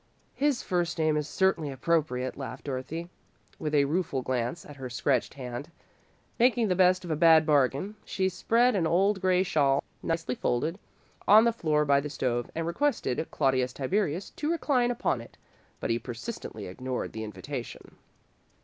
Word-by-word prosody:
"His 285 -3 0
first 175 -2 -1
name 155 -1 +2
is 150 0 -2
certainly 190 -6 +1
appropriate," 135 -2 0
laughed 135 -2 -7
Dorothy, 145 +5 -4 0.5
with 150 -1 -1
a 140 -1 +5
rueful 150 -3 -1
glance 125 +6 -2
at 145 - -11
her 130 -2 -6
scratched 125 +1 0
hand. 125 +1 -6 0.7
Making 240 -2 +3
the 180 - +2
best 185 0 +4
of 170 - -4
a - - +1
bad 160 0 +6
bargain, 145 - +2
she 190 -1 -1
spread 230 +7 +2
an 170 -4 +1
old 190 +4 +2
grey 185 0 +3
shawl, 140 -7 +2 0.2
nicely 165 -5 -1
folded, 155 - -1 0.5
on 215 +2 +8
the 235 0 +3
floor 150 -7 +1
by 140 -1 +4
the 150 +1 -4
stove, 120 -4 -1
and 165 0 -2
requested 170 - -1
Claudius 130 -3 +1
Tiberius 180 +4 -1
to 300 - -3
recline 275 -7 +1
upon 230 - 0
it, 115 - -14 0.4
but - - -2
he 115 - +1
persistently 120 - -7
ignored 125 +7 -4
the 110 - -5
invitation. 120 +3 -7
155 Hz, 165 wpm, -28 LUFS, 130-185 Hz, 0.7 s, on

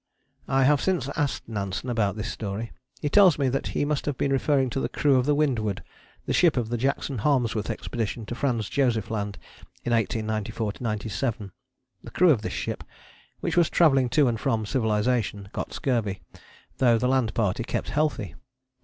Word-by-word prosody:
I 135 0 +3
have 145 +2 +4
since 180 -9 0
asked 140 -6 -1
Nansen 100 +1 -4
about 110 -5 0
this 110 0 -4
story. 110 +2 -5 0.3
He - - +1
tells 185 +2 +6
me 140 -3 +1
that 135 +2 -1
he - - +2
must 150 0 -1
have 145 -3 -1
been 140 - 0
referring 135 -1 +2
to 135 - -1
the - - -1
crew 145 -2 +2
of 125 +1 +1
the 145 - +3
Windward, 110 -10 0 0.4
the - - -1
ship 170 -6 +4
of 115 -3 0
the 120 - -1
Jackson 135 0 -1
Harmsworth 115 -5 +1
Expedition 115 -1 -3
to 120 - -5
Franz 120 -5 -1
Josef 120 -6 0
Land 105 -2 -3 0.5
in 120 - -1
1894 110 -1 -1
97. 110 -1 -3 0.5
The - - -9
crew 180 -2 +4
of 120 -8 +2
this - - -4
ship, - - -4 0.6
which - - -1
was 175 -2 +4
travelling 135 -7 +4
to 140 +2 +4
and 115 -2 0
from 115 -4 0
civilization, 110 -3 0
got - - -4
scurvy, 115 -7 -1 0.6
though 120 -3 +5
the 125 - 0
land 130 -4 +1
party 105 -1 0
kept - - -3
healthy. 150 - -1
120 Hz, 180 wpm, -26 LUFS, 110-140 Hz, 0.6 s, tells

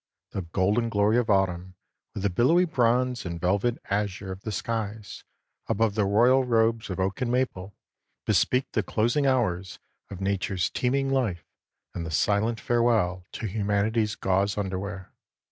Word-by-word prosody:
The 95 - -3
golden 100 +7 0
glory 105 +2 +3
of 120 - -2
autumn, 95 -2 +1 0.4
with 100 - -4
the 100 - +1
billowy 135 - +4
bronze 125 -4 +1
and 85 -2 -5
velvet 100 +7 +1
azure 100 -1 -2
of 95 +1 -7
the 110 - -5
skies 110 -1 -4 0.4
above 110 0 +1
the 105 -2 +1
royal 120 +6 +4
robes 115 -2 +1
of 95 - -4
oak 95 +6 -1
and 120 -1 0
maple, 105 -6 -2 0.5
bespeak 130 +1 +1
the 110 - +1
closing 120 +8 +1
hours 95 -9 0 0.3
of 95 - -8
nature's 95 -1 -1
teeming 135 +2 0
life 105 - -1 0.5
and 85 - -4
the 80 - -5
silent 105 +8 +1
farewell 115 -8 +1
to - - -5
humanity's 105 +1 0
gauze 100 +2 0
underwear. 95 -1 -4
105 Hz, 150 wpm, -26 LUFS, 95-120 Hz, 0.5 s, billowy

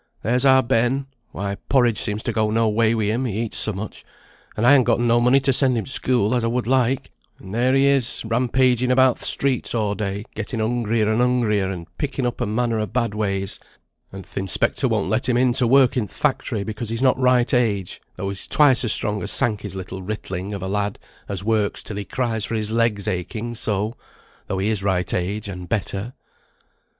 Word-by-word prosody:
There's 125 +5 +1
our 130 -1 +6
Ben; 125 +3 +1 0.2
why, 100 0 -4
porridge 120 -5 +3
seems 105 0 -3
to - - -2
go 110 -1 +1
no 115 +1 +1
way 110 +1 +2
wi' 110 - -1
him, 110 +5 0
he 110 -2 -2
eats 115 - +2
so 110 - +5
much; 105 +2 -7 0.5
and 110 - +1
I 125 - +7
han 140 -2 +7
gotten 120 0 +1
no 120 0 +3
money 125 +3 +4
to 135 0 +2
send 130 -1 +3
him 110 - -2
t' - - 0
school, 125 -4 +1
as 120 -2 +1
I - - +1
would 120 +1 -1
like; 130 +1 0 0.3
and 95 - -12
there 125 +4 +1
he 135 0 +4
is, 135 -4 +3
rampaging 125 +2 +1
about 130 -1 +4
th' - - -4
streets 135 -3 -1
a' 105 -3 0
day, 100 0 -4
getting 115 - -5
hungrier 115 -1 0
and 110 +2 +1
hungrier, 115 -6 +1
and 90 -3 -6
picking 140 -3 -2
up 120 - -3
a' - - 0
manner 115 +1 0
o' 105 - -2
bad 115 -2 -1
ways; 100 -2 -2 0.5
and 95 0 -9
th' - - -14
inspector 95 -2 +1
won't - - 0
let - - 0
him 120 - +2
in 125 0 +3
to 125 -1 +3
work 130 0 +4
in 115 -5 -1
th' - - -17
factory, 105 -3 -1
because 110 +1 -5
he's 115 +3 -3
not 130 -1 +3
right 125 -1 +3
age; 105 -7 0
though 95 +2 -4
he's 100 -1 -4
twice 140 -3 +4
as 115 - +3
strong 105 0 +2
as 105 - -3
Sankey's 105 -6 0
little 95 0 -7
ritling 95 -1 -5
of 100 -2 -5
a - - -3
lad, 100 +1 -2 0.3
as 100 -1 -4
works 110 -1 0
till 105 - -6
he 100 - -4
cries 115 -3 -2
for 115 - -3
his 110 -1 -2
legs 115 -3 0
aching 105 +5 -3
so, 105 0 -2 0.5
though 95 - -3
he 95 +3 0
is 110 -3 -1
right 95 -2 -1
age, 100 +4 -2
and 90 -2 -8
better." 105 +2 -3
115 Hz, 220 wpm, -22 LUFS, 100-125 Hz, 0.5 s, I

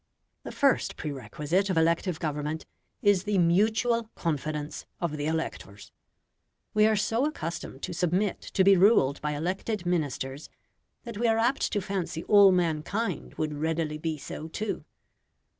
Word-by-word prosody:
The - - -7
first 275 -1 +2
prerequisite 150 - -2
of 185 - 0
elective 165 +1 +1
government 150 0 -3 0.4
is 205 -2 +3
the 205 -1 +1
MUTUAL 220 +6 +2
CONFIDENCE 150 -2 -3
of 170 -3 -2
the 145 0 -2
electors. 130 -11 -4 0.8
We 215 0 +5
are 220 - +3
so 225 +6 +1
accustomed 170 - -6
to 180 - -3
submit 180 +3 0
to 190 - +1
be 195 +1 +7
ruled 175 - +4
by 150 0 -1
elected 185 +5 -3
Ministers, 145 -5 -2 0.5
that 235 -4 -7
we 240 - +2
are 225 0 +3
apt 240 +4 +1
to 205 - +1
fancy 185 -4 -3
all 200 -2 +7
mankind 180 +5 -1
would 155 -1 -2
readily 155 0 -2
be 160 -1 -2
so 150 +2 -7
too. 210 +5 -4
175 Hz, 145 wpm, -28 LUFS, 155-205 Hz, 0.8 s, be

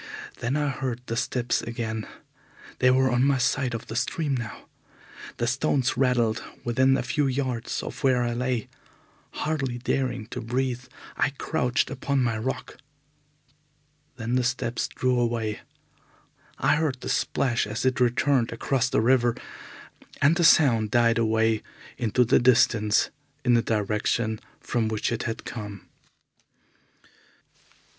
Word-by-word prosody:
Then 125 +4 -1
I 145 -1 0
heard 130 -3 -3
the 115 - -3
steps 120 0 0
again. 110 -2 -4 0.7
They 125 - +5
were 130 0 +3
on 125 +1 +2
my 140 0 +3
side 125 0 0
of 115 - -6
the 110 - -7
stream 145 +3 -1
now. 120 -4 -5 0.7
The 120 - 0
stones 135 +1 +1
rattled 125 -4 +2 0.2
within 130 +3 +3
a - - -2
few 145 -2 0
yards 130 -3 -2
of - - -7
where 130 -2 +3
I 120 0 -1
lay. 125 -1 -1 0.6
Hardly 135 -5 -2
daring 125 -2 -1
to 125 - -5
breathe, 125 +1 -2 0.3
I - - +2
crouched 125 -2 -1
upon 135 +1 0
my 115 -2 0
rock. 130 +4 -4 1.4
Then 115 0 -4
the 125 0 +2
steps 120 -1 -1
drew 125 -1 0
away. 115 -3 -1 1.0
I - - +3
heard 145 -5 -1
the - - -6
splash 120 -5 0
as 105 +4 -3
it 130 0 +1
returned 125 0 +2
across 130 +2 0
the 135 -4 +2
river, 120 0 +3 0.8
and 145 +4 +4
the 175 - +1
sound 120 -9 +5
died 115 +1 +3
away 110 -1 +2 0.4
into 120 +1 +2
the 120 - +4
distance 115 -4 +3 0.3
in 125 - +4
the 120 - +5
direction 110 +1 0 0.2
from 115 -3 -1
which 110 +1 -1
it 120 0 -2
had 115 - -6
come. 105 -4 -7
125 Hz, 140 wpm, -26 LUFS, 115-130 Hz, 1.4 s, They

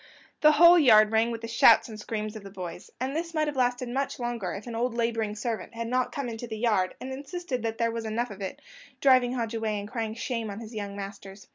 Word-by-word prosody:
The 305 -1 +6
whole 340 +3 +8
yard 215 -7 +6
rang 225 +1 +3
with 230 -1 -5
the 230 - -5
shouts 230 - +6
and 215 -2 -9
screams 215 0 -4
of 215 - -7
the 195 - -10
boys; 180 -2 -8
and 260 +3 -2
this 335 +1 -3
might 310 0 +2
have 295 -1 -3
lasted 250 -1 0
much 265 +3 -2
longer 240 -6 -3
if 195 - -7
an 240 - -6
old 235 +1 -1
labouring 225 -3 -1
servant 230 +1 -4
had 230 0 -3
not 255 +1 0
come 280 -3 -4
into 235 +1 -6
the 220 -1 -5
yard, 210 -5 +1
and 265 +1 -6
insisted 280 -1 -5
that 225 0 -3
there 230 -1 +1
was 230 0 -4
enough 225 +2 -2
of 200 0 -10
it, 190 - -6 0.4
driving 255 -2 +4
Hodge 235 -2 -2
away, 220 -2 -1
and 200 - -6
crying 225 -1 -4
shame 230 -2 -3
on 200 +1 -6
his 230 0 -9
young 205 -2 -5
masters. 195 0 -8
230 Hz, 250 wpm, -27 LUFS, 215-250 Hz, 0.4 s, whole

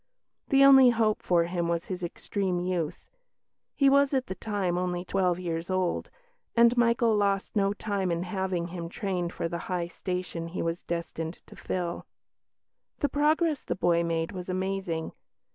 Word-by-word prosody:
The 275 -1 +6
only 265 -2 +9
hope 225 -3 +1
for 175 -2 +3
him 170 0 -2
was 170 0 -1
his 185 -1 -5
extreme 180 +1 -2
youth 175 -3 -3 0.7
he 275 - +4
was 280 0 +4
at 260 -1 +1
the - - -4
time 190 -2 -2
only 180 0 -2
twelve 180 -2 +1
years 170 -1 -3
old 185 -2 -1 0.5
and 235 +1 +6
Michael 235 -1 +3
lost 200 0 0
no 200 -1 +2
time 200 -3 -2
in 170 +1 -1
having 185 -2 -2
him 170 -1 -6
trained 180 -3 -2
for - - -3
the 170 0 -4
high 175 -2 -1
station 180 -2 -4
he 170 - -4
was 165 +1 -2
destined 170 -1 -4
to - - -14
fill. 175 -2 -4 0.9
The 290 - 0
progress 305 +2 +2
the - - -3
boy 170 -2 +2
made 165 0 -1
was 185 -2 -7
amazing. 185 -3 -2
185 Hz, 165 wpm, -28 LUFS, 170-210 Hz, 0.9 s, only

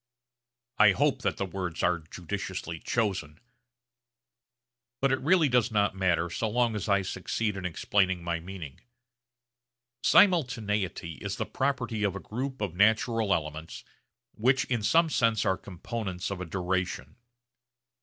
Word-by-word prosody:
I 105 -2 +7
hope - - +1
that - - -1
the 100 - -1
words 90 -2 -4
are 90 -1 +2
judiciously 90 +1 -5
chosen; 95 -10 -2 1.6
but 135 0 +2
it 130 - +1
really 160 +2 +4
does 125 -2 +2
not 100 -2 +2
matter 90 -3 +1
so 110 +5 -1
long 120 0 +1
as 105 0 -3
I 100 -1 +3
succeed 105 +3 -2
in 95 -2 -5
explaining 95 +1 +1
my 85 -1 -1
meaning. 85 -5 -9 1.2
Simultaneity 110 - +2
is - - -3
the - - -2
property 125 -5 -1
of 100 -2 0
a - - -4
group 130 +5 -5
of 100 -5 -2
natural 110 +2 +2
elements 80 -1 -3 0.5
which 130 +4 +2
in 120 -3 -1
some 165 +10 +4
sense 115 -6 +2
are 95 - +3
components 95 0 -5
of 95 -2 -4
a - - -3
duration. 90 -5 -3
100 Hz, 140 wpm, -28 LUFS, 90-115 Hz, 1.6 s, I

